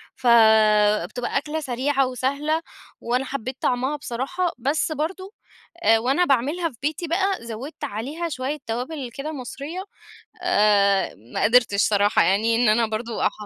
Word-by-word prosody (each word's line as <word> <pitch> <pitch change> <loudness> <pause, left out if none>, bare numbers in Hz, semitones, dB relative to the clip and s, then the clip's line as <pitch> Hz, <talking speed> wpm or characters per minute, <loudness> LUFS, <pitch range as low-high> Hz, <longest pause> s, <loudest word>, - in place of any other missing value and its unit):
فبتبقى 220 -1 +3
أكلة 305 +2 -2
سريعة 270 0 0
وسهلة، 280 +5 -1 0.4
وأنا 250 +3 -1
حبيت 260 -1 -5
طعمها 255 +4 0
بصراحة، 295 +7 -3
بس 285 +6 -1
برضو 375 +7 -4 0.5
آآ، 225 0 +5
وأنا 270 +10 +2
باعملها 295 +5 +1
في 240 - -19
بيتي 305 +4 -2
بقى 355 +4 +1 0.2
زودت 235 +7 -8
عليها 285 +12 -4
شوية 275 0 -3
توابل 250 +4 -4
كده 295 +3 -5
مصرية، 290 +6 -6 0.6
آآ، 205 - +3 0.2
ما - - -1
قدرتش 225 -3 +4
صراحة 205 0 +3
يعني 220 +4 +2
إن 240 -1 +3
أنا 225 +2 +3
برضو 220 +1 -4
اح - - +2
255 Hz, 140 wpm, -23 LUFS, 225-300 Hz, 0.6 s, آآ